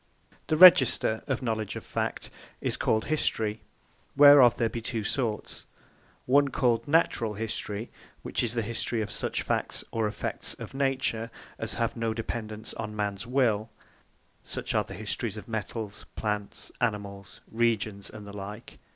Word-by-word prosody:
The 155 - +1
Register 130 -10 +7
of 130 -1 -1
Knowledge 110 -3 -2
Of - - -7
Fact - - -3 0.3
is - - -1
called 110 0 +1
History. 110 -8 0 0.6
Whereof 145 -5 +8
there 115 - +2
be 115 +1 -5
two 115 -1 -3
sorts: 110 -1 -3 0.6
one 140 +2 +4
called 125 -3 +1
Naturall 130 -8 +2
History; 110 0 -3 0.3
which - - -2
is 120 0 0
the 115 - 0
History 115 +1 -1
of 105 - -6
such - - -2
Facts, - - -1
or 115 -1 0
Effects 105 - -2
of - - -9
Nature, 135 -4 0 0.3
as - - -3
have 115 -1 -1
no 115 -1 -1
Dependance 110 -1 -4
on 105 -1 -5
Mans 105 +1 -2
Will; 115 -4 +1 0.7
Such - - -3
as - - +3
are - - 0
the - - -7
Histories 110 0 -3
of 105 - -9
Metals, 110 -1 -5
Plants, 105 -2 -3
Animals, 100 -4 -3
Regions, 110 -3 0
and 105 -1 -10
the 100 0 -9
like. 105 +3 -8
110 Hz, 155 wpm, -28 LUFS, 105-120 Hz, 0.7 s, Whereof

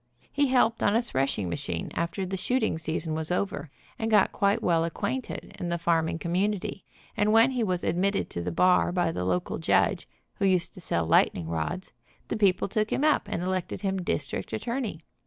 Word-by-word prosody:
He 285 0 +2
helped 245 -3 +2
on 205 - +3
a 230 - +4
threshing 135 - -1
machine 85 -1 -3
after 170 +3 -2
the 190 +1 -3
shooting 220 -2 0
season 160 0 -2
was 160 +1 -2
over, 180 -5 -2 0.3
and 225 - -1
got 210 -3 +4
quite 200 0 +1
well 165 -2 +3
acquainted 210 +9 -4
in 175 - -3
the 170 - 0
farming 165 -1 +1
community, 190 +4 -1 0.3
and 210 +1 +2
when 225 +4 +6
he 250 -3 0
was 180 -4 0
admitted 195 +3 +1
to 85 - -3
the 90 - -3
bar 180 - +3
by 175 -2 +1
the 90 - -3
local 90 -1 -1
judge, - - +2 0.3
who 200 - +2
used 185 -3 +2
to 185 - -11
sell 85 - -1
lightning 80 0 +3
rods, 85 - -3 0.4
the - - -1
people 200 -4 +2
took 215 +2 -1
him - - 0
up 305 -8 +3
and 205 -4 -3
elected 185 -1 -2
him 190 -2 -1
district 145 -5 -3
at - - -5
torney. 235 -9 -3
185 Hz, 195 wpm, -27 LUFS, 160-210 Hz, 0.4 s, when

